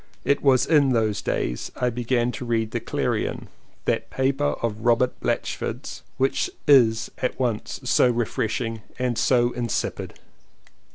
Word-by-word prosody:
It 140 - +2
was 130 -3 +4
in 145 -5 +4
those 110 -3 +1
days - - -2
I 125 0 0
began 120 0 0
to 125 - -6
read 115 -2 -1
The - - -1
Clarion^ - - -2 0.4
that - - 0
paper 135 +2 0
of 110 -2 -1
Robert 120 +1 +3
Blatch - - -1
ford's - - -5 0.2
which 135 +1 +1 0.2
is 115 -5 +5
at 125 - -2
once 120 -4 -2
so 125 - +4
refreshing 115 -1 -2 0.2
and 125 -1 -1
so 120 -1 +3
insipid. 120 -2 -3
120 Hz, 145 wpm, -24 LUFS, 115-130 Hz, 0.4 s, is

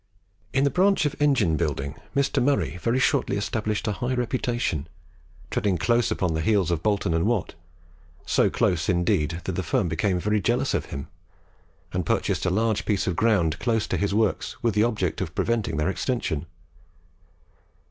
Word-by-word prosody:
In 135 - +2
the 140 - +2
branch 195 -2 +3
of 145 - -1
engine 120 - +3
building 70 -4 -2 0.2
Mr. 140 0 +1
Murray 135 -8 +1
very 115 +7 0
shortly 130 - +1
established 105 +1 -2
a - - +1
high 125 +5 -2
reputation, 120 - -1 0.6
treading 95 -3 +1
close 120 +6 +2
upon 90 -6 0
the 80 - -1
heels 95 -1 +2
of 85 -2 0
Boulton 100 -4 +1
and 85 +4 +1
Watt 115 -5 0 0.7
so - - +3
close, 85 -2 0
indeed, 85 -2 +1
that - - -2
that 95 - -1
firm 90 +2 0
became 90 +3 0
very 105 +3 +1
jealous - - +1
of - - 0
him, 70 0 -6 0.9
and 90 0 0
purchased - - 0
a - - +3
large 110 +3 +1
piece 105 -3 0
of 90 - -1
ground 95 -7 +2
close 115 -3 +1
to - - -2
his 100 0 0
works 105 0 0
with 115 -2 +2
the 105 - +2
object 105 -8 -1
of 90 -2 -4
preventing 115 -7 0
their 75 +4 +1
extension. 90 - -2
100 Hz, 175 wpm, -25 LUFS, 85-120 Hz, 0.9 s, branch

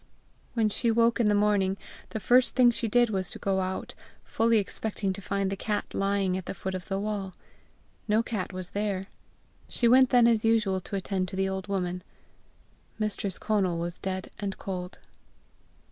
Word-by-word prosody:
When 225 -2 +3
she 235 +3 +1
woke 230 +1 +3
in 230 - +3
the 210 - +3
morning, 205 -2 +2 0.3
the 220 - -4
first 245 +4 +4
thing 250 -2 +6
she 230 0 -2
did 240 +1 +3
was 190 -2 0
to - - -6
go 195 -1 0
out, 190 0 -3 0.3
fully 230 0 +2
expecting 205 -1 -2
to 200 - -8
find 195 0 -1
the - - -1
cat 210 +1 -3
lying 195 -1 +1
at 185 -1 -5
the - - -4
foot 190 +1 -4
of 185 -2 -5
the 195 - -1
wall. 200 -2 -3 0.7
No 215 +2 +3
cat 210 -6 -3
was 185 -1 -6
there. 200 -2 -2 0.6
She 240 - +2
went 255 +2 +6
then 245 -2 +6
as 225 -2 +3
usual 215 -4 +2
to 200 - -6
attend 190 -1 -1
to 185 - -6
the 190 0 +1
old 190 0 -4
woman. 180 -2 -2 1.0
Mistress 210 -3 -2
Conal 195 -5 0
was 170 +1 -3
dead 190 -1 -4
and 200 -2 -3
cold. 180 -1 -5
200 Hz, 185 wpm, -28 LUFS, 190-220 Hz, 1.0 s, thing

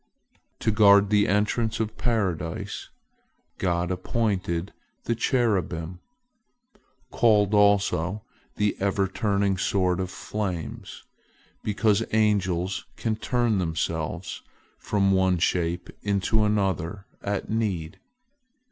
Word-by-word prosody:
To 110 - +2
guard 100 -1 +6
the 105 -1 +4
entrance 110 +3 +1
to 110 - +1
Paradise, 105 -7 -2 0.7
God 90 -1 0
appointed 95 -2 -1 0.3
the 115 - 0
cherubim, 95 - 0 1.1
called 105 -3 +3
also 100 -2 +2 0.3
the 105 -1 +1
ever 100 0 +1
turning 100 -1 0
sword 90 -2 +1
of 95 -1 -2
flames, 95 -5 -5 0.6
because 105 -1 +2
angels 95 -4 +1
can 110 -2 -1
turn 120 -2 0
themselves 85 0 -3 0.4
from 100 -2 +1
one 95 -1 +3
shape 85 0 -1
into 105 +2 +1
another 100 -2 -1 0.2
at 100 +1 -3
need. 95 -8 -2
100 Hz, 95 wpm, -26 LUFS, 90-105 Hz, 1.1 s, guard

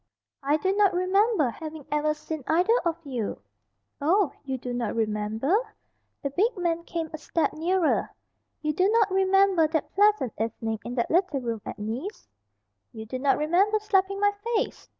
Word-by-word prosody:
"I 290 +2 +2
do 380 +5 0
not 405 -3 +3
remember 370 - +2
having 310 +1 -8
ever 300 +1 +1
seen 305 -1 -6
either 360 +8 +3
of 335 -1 0
you." 245 -7 -3 0.6
"Oh, 350 +4 +3
you 265 -2 -3
do 250 0 -5
not 235 -3 -2
remember?" 220 - 0 0.7
The 280 - -2
big 425 - +1
man 340 -2 0
came 330 -2 -4
a 315 - -5
step 320 +1 -1
nearer. 345 +2 +1 0.5
"You 305 0 0
do 370 +5 +2
not 435 -3 +3
remember 385 -3 +4
that 315 0 -2
pleasant 410 - +3
evening 225 -1 -2
in 245 - -5
that 235 - -1
little 340 -5 +2
room 230 -3 -3
at - - -6
Nice?" 235 - -5 0.6
"You 220 -2 -8
do 255 +4 -5
not 275 +1 +2
remember 360 +8 +2
slapping 395 -2 +1
my 410 0 +4 0.2
face?" 430 - -2
320 Hz, 170 wpm, -26 LUFS, 260-385 Hz, 0.7 s, remember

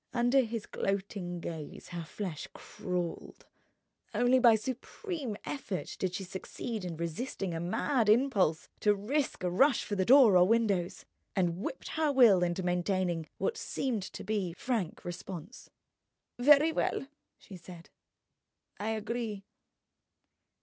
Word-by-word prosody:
Under 245 +3 +4
his 230 -3 -4
gloating 195 -3 -3
gaze 160 -3 -7
her 175 -2 -5
flesh 165 -1 -5
crawled. 180 -2 -5 0.7
Only 245 +1 +4
by 235 -3 +7
supreme 260 - -4
effort 235 -10 -4
did 185 -1 -1
she 195 - -4
succeed 195 +4 -6
in 170 -3 -5
resisting 170 +3 -3
a 165 - -3
mad 215 - +1
impulse 210 - +3
to 210 -1 +3
risk 260 +4 -2
a 180 - +1
rush 265 +8 +4
for 205 - -3
door 240 -4 +7
or 180 0 +6
windows, 205 -6 +1 0.3
and 175 -2 +1
whipped 265 - -5
her 315 -2 +1
will 235 -9 +6
into 175 +1 0
maintaining 180 -2 0
what 465 - -1
seemed 250 - -2
to 190 - -7
be 200 -5 -1
frank 210 -3 -3
response. 175 - -8 0.7
"Very 295 +5 +6
well," 295 - -1 0.3
she 195 - -12
said; 175 -1 -12 0.9
"I 210 +2 -2
agree." 220 -2 -4
200 Hz, 130 wpm, -31 LUFS, 180-245 Hz, 0.9 s, by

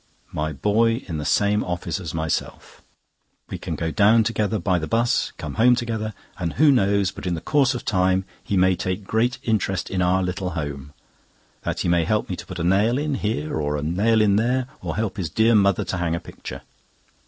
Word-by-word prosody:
My 75 0 -2
boy 115 - +1
in 80 -4 -4
the 75 - -4
same 105 +1 +2
office 90 +2 -3
as 85 -5 -5
myself—we 80 -1 -6
can - - -4
go 80 -1 -2
down 110 +4 +5
together 110 -1 0
by 90 -1 +1
the 80 - -4
'bus, 115 +1 +1
come - - -6
home 125 +1 +6
together, 110 -3 -3 0.2
and 85 -3 -2
who 150 0 +5
knows 100 -6 +2
but - - -7
in 90 - 0
the - - -4
course 135 - +2
of 125 - -6
time 95 -1 +2 0.2
he 100 - -1
may 95 0 +4
take 95 +3 -3
great 115 +5 0
interest 100 -6 -1
in 95 -1 0
our 90 +1 +2
little 90 +1 -2
home. 70 -2 -5 0.7
That - - -3
he - - -1
may 85 -1 +3
help 105 +5 0
me - - -1
to - - -9
put 95 - -7
a 85 - -2
nail 100 +7 +3
in 150 0 -1
here 105 - -2
or 75 0 -1
a 75 - -4
nail 105 +8 +2
in 100 -2 +4
there, 125 +3 +1 0.2
or 85 -3 -4
help 110 -2 -2
his 90 -5 -2
dear 110 +8 +3
mother 100 -3 +3
to 95 - -3
hang 85 -2 0
a - - -2
picture. - - -9
100 Hz, 210 wpm, -23 LUFS, 85-110 Hz, 0.7 s, home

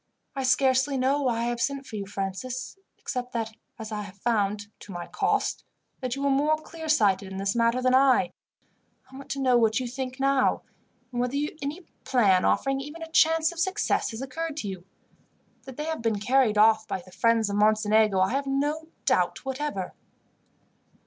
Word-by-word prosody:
I 270 - -2
scarcely 265 +1 +2
know 270 +3 +2
why 240 -4 0
I - - 0
have 240 0 -2
sent 275 -1 -1
for 220 - -9
you, 200 -2 -4
Francis, 205 - -4 0.2
except 250 -1 -5
that 225 -2 -3 0.2
as 220 -1 -7
I 210 -1 -3
have 200 -1 -10
found, 205 -2 0
to 205 - -11
my 175 -1 -5
cost, - - -1 0.4
that 255 -2 -3
you 275 - -4
were 280 - +2
more 295 +3 +3
clear 320 0 -9
sighted 200 -9 +2
in 190 - -6
this 195 +2 -1
matter 235 +2 +2
than 255 0 +3
I, 260 -1 +4 0.8
I - - -12
want 275 +1 -10
to 275 - -3
know 255 -2 +4
what 225 0 +2
you 255 - -3
think 260 +1 -5
now, 275 -1 +2 0.5
and 245 -1 -1
whether 250 +2 -1 0.3
any 290 +6 -4 0.2
plan 200 -8 +3
offering 270 0 +1
even 300 +4 -8
a 325 - -9
chance 320 0 +4
of 345 - -9
success 375 +4 0
has 230 +3 -6
occurred 315 +3 -4
to 215 - -3
you. 185 -2 -6 0.8
That 265 -2 -10
they 300 - -3
have 320 -5 -3
been 225 -3 0
carried 245 -1 +2
off 220 +1 +5
by 185 - -4
the 185 - -16
friends 225 +4 +2
of 200 - -1
Mocenigo 215 -1 +3
I 190 - +2
have 275 +2 -1
no 295 +4 -1 0.2
doubt - - +1
whatever." 265 -8 -3
255 Hz, 195 wpm, -26 LUFS, 215-275 Hz, 0.8 s, off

